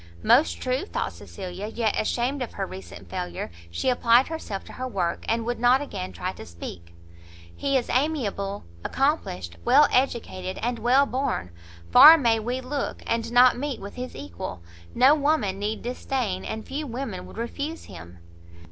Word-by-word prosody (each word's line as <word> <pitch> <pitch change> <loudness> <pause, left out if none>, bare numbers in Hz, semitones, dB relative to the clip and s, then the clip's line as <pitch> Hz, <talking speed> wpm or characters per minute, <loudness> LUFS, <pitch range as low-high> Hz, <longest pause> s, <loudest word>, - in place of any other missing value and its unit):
Most 85 0 +4
true! 255 +2 -1
thought - - -3
Cecilia, 190 +1 -7
yet 220 -1 -1
ashamed 250 +5 -1
of 250 - -4
her - - -3
recent 95 0 -10
failure, 85 0 -5 0.2
she 85 - -3
applied 245 +1 +4
herself 265 -12 -5
to - - -12
her 255 - -4
work, 180 -8 -2
and 230 0 0
would 240 0 -2
not 245 +2 +5
again 195 -10 -5
try 185 +1 -4
to - - -10
speak. 85 0 -10 0.6
"He 275 -1 +1
is 245 - -2
amiable, 230 -9 -1 0.2
accomplished, 90 - -1
well 295 - +6
educated, 205 -8 0
and 240 0 -1
well 255 +5 +4
born; 255 - -2 0.4
far 315 - +11
may 230 -6 +2
we 245 +4 -3
look, 275 +2 -4
and 230 0 -1
not 245 0 +6
meet 280 -2 -3
with 200 +1 -8
his 250 0 -6
equal; 90 -1 -7 0.3
no 260 +4 +6
woman 285 -10 +1
need 210 +2 -3
disdain, 240 -5 -2
and 220 0 -5
few 290 +3 -4
women 230 -7 -5
would - - -13
refuse 285 +7 -4
him." 85 -2 -11
235 Hz, 165 wpm, -25 LUFS, 185-265 Hz, 0.6 s, far